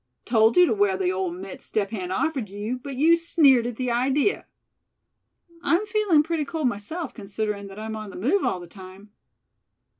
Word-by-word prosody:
"Told 225 -1 +3
you 360 - +8
to 320 - +1
wear 200 -2 +2
the 185 -1 0
old 185 -2 -2
mitts 190 +1 -8
Step 205 -1 -2
Hen 185 -5 -4
offered 265 - -1
you, 210 +5 -4
but 275 +1 -7
you 320 +6 +5
sneered 285 -8 +4
at 240 - -5
the 250 0 -2
idea. 270 +9 +1 1.1
I'm 350 +4 +1
feeling 420 -8 +3
pretty 320 -1 -1
cold 310 -1 -2
myself, 250 - -4
considerin' 205 -1 -4
that 195 0 -11
I'm 220 0 -5
on 215 -1 -7
the - - -11
move 295 - +1
all 185 - 0
the 175 - -9
time. 190 +3 -13
225 Hz, 185 wpm, -24 LUFS, 200-300 Hz, 1.1 s, you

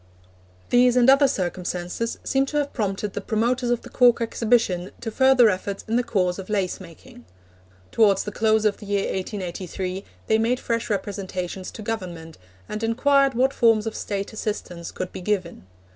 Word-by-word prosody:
These 245 0 +5
and 245 0 +5
other 275 +1 +5
circumstances 180 0 -3
seem 270 0 +1
to 295 - -2
have 290 -1 -1
prompted 205 -2 -2
the - - -3
promoters 240 +4 0
of 240 -1 0
the - - -10
Cork 245 -2 +5
Exhibition 225 -6 +1
to 225 - -5
further 260 0 +5
efforts 200 0 -2
in 225 - 0
the 245 - +4
cause 195 -6 0
of 190 - -8
lace 195 -4 -1
making. 165 -8 -14 0.7
Towards 200 -4 +4
the 210 - -5
close 220 0 +2
of 210 -2 +2
the 205 - -11
year 200 -1 0
1883 185 -1 -4 0.2
they 220 - +2
made 240 +3 +1
fresh 230 0 -2
representations 190 -2 -4
to 215 - -9
Government, 175 -7 -5 0.3
and 215 - -5
inquired 275 +3 +3
what 260 +3 +2
forms 225 -2 +3
of 225 - -3
State 200 +1 -4
assistance 180 -6 -5
could 185 - -5
be - - -6
given. 180 - -2
215 Hz, 175 wpm, -24 LUFS, 185-235 Hz, 0.7 s, These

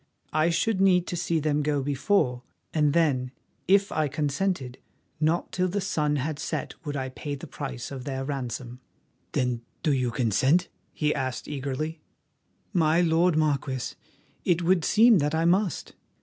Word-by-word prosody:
I 155 +2 +3
should 190 +4 +1
need 180 -2 +4
to - - -2
see 170 -1 0
them 150 -1 +1
go 145 -2 0
before, 135 -2 +1 0.3
and 150 -2 +3
then, 140 -7 +2 0.4
if 200 +2 +4
I 155 -1 +1
consented, 145 -1 -2 0.4
not 160 +3 +1
till 185 0 +1
the 195 +3 -1
sun 150 -6 0
had 145 +2 -2
set - - -3
would 145 -2 -3
I 130 -1 -3
pay 145 +2 -5
the 140 - -9
price 135 -4 -6
of 135 -2 -6
their 135 0 -3
ransom." 125 -3 -4 0.5
"Then 125 -2 0 0.2
do 150 - +3
you 130 -2 +1
consent? 130 - +2 0.2
he 150 -1 0
asked 130 -3 -3
eagerly. 150 +3 -4 0.7
"My 160 -1 +3
lord 165 0 +3
Marquis, 140 -4 0 0.5
it 175 -1 +2
would 175 -1 +3
seem 220 +1 +6
that 150 +1 0
I 165 +1 +1
must. 185 +2 +1
150 Hz, 160 wpm, -26 LUFS, 135-170 Hz, 0.7 s, seem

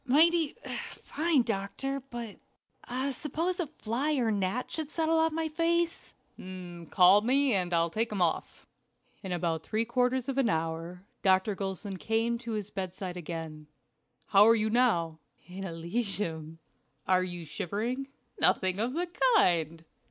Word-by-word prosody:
"Mighty 320 +3 +4 0.3
fine, 310 -4 0
doctor; 230 +6 -2
but 235 -3 -6 0.7
suppose 325 +7 -2
a 345 - -1
fly 280 +1 -2
or 245 -5 +1
a - - +2
gnat 205 +4 -1
should 315 -3 -3
settle 320 +1 +1
on 320 -1 +2
my 325 -1 0
face?" 335 +2 -1 0.7
"Call 185 +2 +6
me 265 +3 +3
and 180 -3 +1
I'll 170 -1 +2
take 225 +5 -1
him 205 - -2
off." 175 -2 -1 0.6
In 190 - -6
about 165 -2 -1
three 220 +6 -1
quarters 250 +2 +1
of 270 0 -1
an 250 -4 +3
hour 165 +1 -2 0.2
Dr. 190 +2 +3
Gulson 195 0 -4
came 225 +4 0
to 235 -2 -5
his 210 -1 -4
bedside 185 -1 -5
again. 160 -3 -6 0.6
"How 205 +1 +7
are 230 - +7
you 215 -1 0
now?" 175 -10 +2 0.3
"In 185 +2 -8
Elysium." 170 -2 -3 0.5
"Are 185 -1 +4
you 175 -2 -6
shivering?" 225 - -3 0.3
"Nothing 185 0 +2
of 235 +4 0
the 345 +4 0 0.3
kind." 165 - +2
215 Hz, 145 wpm, -30 LUFS, 180-265 Hz, 0.7 s, How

